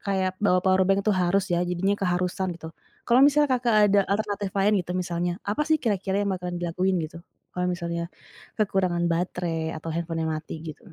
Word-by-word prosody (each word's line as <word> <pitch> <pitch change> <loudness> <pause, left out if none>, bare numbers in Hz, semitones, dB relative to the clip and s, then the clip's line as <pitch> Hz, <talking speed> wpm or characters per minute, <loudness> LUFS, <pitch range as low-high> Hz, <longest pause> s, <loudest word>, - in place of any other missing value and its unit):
kayak 190 -1 0
bawa 180 -2 +4
powerbank 190 +1 +3
tuh 205 -3 +3
harus 185 +2 +2
ya. 170 - +2
Jadinya 180 +3 0
keharusan 180 0 -1
gitu, 160 -1 -9 0.4
kalau 245 +2 +5
misalnya, 295 0 +4
Kakak 235 -2 +1 0.2
ada 205 - +5
alternatif 205 -1 -1
lain 205 +2 +3
gitu, 180 - -5
misalnya 175 -1 -1
apa 210 +9 0
sih 315 - +5
kira-kira 200 -3 0
yang - - -1
bakalan 180 -1 -5
dilakuin 180 +2 0
gitu, 165 +2 -8 0.4
kalau 180 - -1
misalnya 170 -1 -3 0.5
kekurangan 185 -4 +1
baterai 165 -2 -2
atau 160 +1 -7
handphone-nya 165 -1 -2
mati 155 0 -5
gitu? 165 +4 -10
180 Hz, 175 wpm, -25 LUFS, 170-200 Hz, 0.5 s, kalau